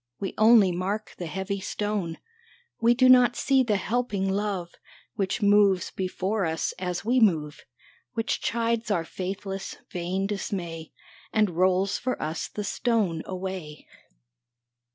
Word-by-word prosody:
We 195 - -3
only 215 -3 +6
mark 195 +5 -3
the 175 - -4
heavy 190 +3 -3
stone, 200 -4 -3 0.6
We 235 +1 +4
do 255 +1 +5
not 250 -1 +6
see 270 -1 +3
the 230 -5 +1
helping 205 -1 -1
Love 195 -4 -2 0.4
Which 195 +1 -2
moves 200 -2 +4
before 190 +2 -2
us 160 -1 -1
as 180 +2 -3
we 250 +3 +3
move, 155 - +2 0.5
Which 225 0 -1
chides 230 -1 -1
our 175 -5 0
faithless, 195 +2 -5 0.2
vain 180 +2 -2
dismay, 175 -5 -4 0.4
And 215 -4 +2
rolls 185 +3 +2
for 255 0 -2
us 155 +2 -3
the 210 - -5
stone 200 -5 0
away 185 -5 -6
195 Hz, 135 wpm, -26 LUFS, 180-215 Hz, 0.6 s, only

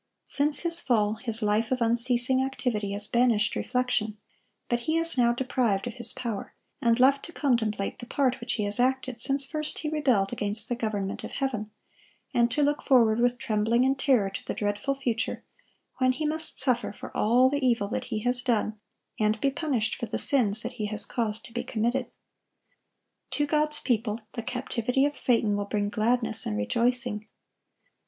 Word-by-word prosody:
Since 295 +1 +2
his 340 -1 +6
fall, 215 -9 +1
his 230 -1 +1
life 210 +3 +1
of 255 - +1
unceasing 245 +2 +1
activity 235 -6 -2
has 205 +1 -1
banished 235 -2 +2
reflection; 250 -4 -1 0.5
but 240 - 0
he 320 - +2
is 330 0 +2
now 240 -2 +3
deprived 240 -5 -1
of 240 - -5
his 240 -2 -1
power, 235 -5 -6 0.3
and 235 -2 +2
left 275 +2 +4
to 340 - -10
contemplate 225 -10 -1
the 240 - -8
part 260 -2 0
which 235 +1 -2
he 215 - -2
has 205 +3 0
acted 260 -1 0
since 275 +2 +3
first 305 +1 -3
he 305 - -3
rebelled 255 -11 +1
against 210 +2 0
the 245 - 0
government 210 -4 -3
of - - -6
heaven, 245 -6 -3 0.6
and 235 0 +3
to 290 +5 0
look 290 +1 0
forward 230 -4 +3
with 245 0 +2
trembling 225 +3 +1
and 265 0 0
terror 245 -9 +2
to - - -6
the - - -5
dreadful 205 +6 -2
future, 240 -5 -2 0.6
when 255 0 +3
he 305 +4 -4
must 315 +1 0
suffer 250 -3 +1
for - - -11
all 245 +4 +4
the 285 +1 -1
evil 235 -5 +1
that - - -4
he 215 - -4
has 245 +2 0
done, 220 -3 -1 0.4
and 215 0 +1
be 275 - +1
punished 270 -6 -1
for 235 - -5
the 220 - -3
sins 220 -6 +3
that 240 +2 -5
he 215 -4 -4
has 210 -1 +5
caused 220 -2 -2
to 235 - -11
be 240 - -3
committed. 240 +3 -1 1.2
To 295 - 0
God's 300 0 +1
people, 225 -2 -1
the 235 - -4
captivity 250 +1 -1
of 290 0 -2
Satan 225 -4 +4
will 205 0 -2
bring 205 0 -2
gladness 225 +1 0
and 105 - -2
rejoicing. 235 - 0
240 Hz, 185 wpm, -27 LUFS, 215-265 Hz, 1.2 s, his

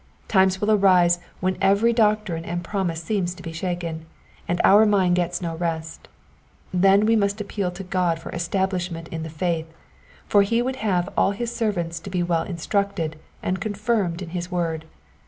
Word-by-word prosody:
Times 190 -2 +3
will 210 +2 +1
arise 180 -4 +5 0.2
when 185 0 0
every 200 +4 +4
doc 215 -2 +3
trine 165 -4 -4
and 175 +1 -4
promise 175 -4 -2
seems 180 -2 -1
to 180 - -12
be 165 -1 -6
shaken, 165 -2 -4 0.4
and 175 0 0
our 205 +2 +7
mind 195 -4 +3
gets 175 0 -1
no 165 -1 -3
rest: 160 -1 -4 0.7
then 195 +3 +5
we 225 +1 +4
must 200 0 +1
appeal 200 -2 -2
to 180 +2 -7
God 180 -3 0
for - - -8
establishment 175 -1 -2
in 160 - -5
the 160 - -5
faith, 160 0 -2 0.5
for 205 - +4
he 230 +4 +1
would 260 +2 -1
have 185 -6 0
all 200 - +3
his 235 +3 -4
servants 175 -7 -1
to 180 - -9
be 180 -2 0
well 170 -2 +1
instructed 180 -2 -2 0.3
and 185 +1 -1
confirmed 205 -4 -1
in 170 - -8
his 175 +1 -4
word. 165 -3 -2
180 Hz, 180 wpm, -23 LUFS, 170-200 Hz, 0.7 s, our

